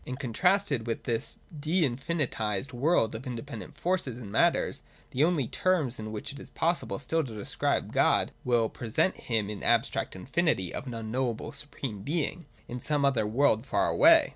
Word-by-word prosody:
And 130 - -5
contrasted 145 - +1
with 115 - -2
this 115 -1 -2 0.2
de 160 +5 +2
infinitised 125 - -2
world 125 -3 +2
of 115 +5 -6
independent 125 +2 -6
forces 170 -7 -1
and 110 -5 -8
matters, - - +2 0.3
the 135 - +2
only 160 -7 +2
terms 155 -10 +1
in 110 0 -5
which 110 +6 -5
it 140 - -9
is - - -10
possible 170 +1 0
still 160 +4 0
to 120 -6 -7
describe 105 - -1
God - - +3
will 120 -2 +3
pre 115 +1 -7
sent 185 - +2
Him 110 -4 -1
in 105 -1 -5
the - - -1
abstract - - +1
infinity 130 - 0
of 140 - -5
an 120 - -5
unknowable 115 +1 -2
supreme 140 -6 -6
Being 165 - -2 0.2
in 125 - -5
some 145 +2 +1
other 120 -6 +2
world 115 -1 +3
far 140 - +1
away. 325 0 +6
130 Hz, 180 wpm, -29 LUFS, 115-155 Hz, 0.3 s, away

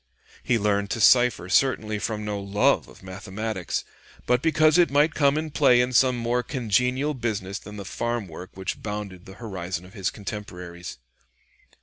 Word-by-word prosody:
He 120 - +1
learned 100 -1 0
to 115 - -2
cipher 120 -4 +5
certainly 110 0 +2
from 105 0 -3
no 105 -1 -2
love 100 +1 +2
of - - -16
mathematics, 95 +1 -4 0.4
but 125 0 +2
because 155 +1 +4
it 175 - +5
might 145 +3 +3
come 140 -1 +3
in 155 0 -3
play 135 -5 +5
in 125 +1 +1
some 125 0 +4
more 120 +1 0
congenial 125 +4 0
business 105 -6 -3
than 105 0 -10
the 100 - -7
farm 120 +1 -3
work 90 +2 -9
which 95 - -4
bounded 105 -4 -6
the 95 - -11
horizon 95 -5 -5
of 95 - -15
his 95 -4 -1
contemporaries. 90 - -7
110 Hz, 170 wpm, -25 LUFS, 95-125 Hz, 0.4 s, cipher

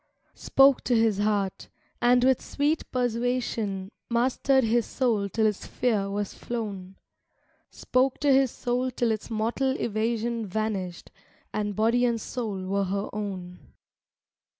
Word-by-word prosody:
Spoke 275 -1 +4
to 245 - +2
his 225 -3 +2
heart, 205 -2 -1 0.3
and 245 +1 +4
with 260 -1 +3
sweet 295 +3 -1
persuasion 235 -5 -1 0.2
Mastered 260 +3 +2
his 230 0 +1
soul 225 -6 0
till 220 +3 +1
its 210 -2 -1
fear 215 -5 0
was 205 0 -3
flown; 200 -5 -5 0.7
Spoke 255 +1 0
to 285 -2 +4
his 265 -1 +4
soul 250 +2 -1
till 240 -2 0
its 215 -1 -4
mortal 235 +4 0
evasion 230 +1 -1
Vanished, 195 -3 -3 0.4
and 210 -1 -2
body 230 +4 +2
and 235 -2 +2
soul 215 -5 -4
were 200 +1 0
her 200 +2 -3
own. 190 -4 -5
225 Hz, 130 wpm, -27 LUFS, 205-245 Hz, 0.7 s, Spoke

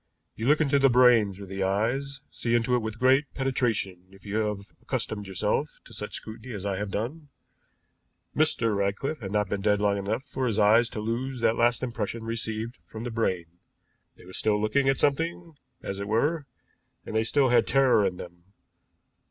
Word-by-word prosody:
You 110 - -3
look 150 +2 +5
into 140 -2 +3
the 135 0 +5
brain 120 -4 +5
through 100 +1 -9
the 95 +1 -5
eyes, 120 +8 -1
see 120 0 -1
into 120 +1 +1
it 125 - +3
with 110 0 -5
great 135 +4 +3
penetration 115 -9 -1
if 95 +1 -18
you 105 +1 -2
have 105 -2 -2
accustomed 110 -5 -3
yourself 95 -1 -1
to - - -14
such - - -5
scrutiny 110 +2 -7
as 100 -1 -6
I 100 -2 -1
have 105 +1 -3
done. 140 +10 -4 1.1
Mr. 115 -8 +2
Ratcliffe 100 +10 -1
had 95 -5 -6
not 105 -1 +1
been 100 +1 -2
dead 105 0 +2
long 100 -1 +1
enough 100 +6 -2
for 130 -2 -3
his 110 -3 -1
eyes 110 +3 +5
to - - -6
lose 120 +4 -3
that 115 - +3
last 120 +1 +2
impression 115 -2 -3
received 115 +1 -4
from 110 +1 -7
the 120 - -4
brain. 95 -7 0 0.7
They - - -17
were 95 - -12
still 105 +1 +1
looking 135 +6 +2
at 135 - +2
something, 165 +3 0 0.3
as 100 0 -4
it 100 - -4
were, 145 +8 0 0.6
and - - -6
they 110 - +3
still 130 +3 +2
had 120 -2 +4
terror 130 -5 +4
in 90 -2 -1
them. 85 -1 -11
115 Hz, 195 wpm, -27 LUFS, 100-130 Hz, 1.1 s, look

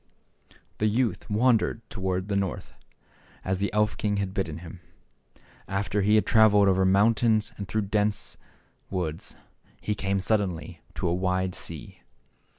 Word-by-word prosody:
The 110 - +3
youth 115 -2 0
wandered 115 0 +2
toward 95 -2 -2
the 100 - -1
North, 100 -2 -2 0.7
as 95 0 0
the 100 - 0
elf 105 0 +1
king 105 -1 0
had 100 -1 -2
bidden 85 -6 -2
him. 85 +1 -10 0.9
After 100 +1 -1
he 105 +2 +4
had 110 - +4
traveled 105 -3 +5
over 95 0 +3
mountains 110 +3 +3
and 100 - -6
through 110 +4 0
dense 105 +1 0
Ik, - - -31
woods, 85 -5 -3 0.4
he 105 - -1
came 100 -1 -1
suddenly 90 -5 -1
to - - -1
a 85 - +1
wide 90 0 0
sea. 85 -4 -9
100 Hz, 150 wpm, -27 LUFS, 95-105 Hz, 0.9 s, traveled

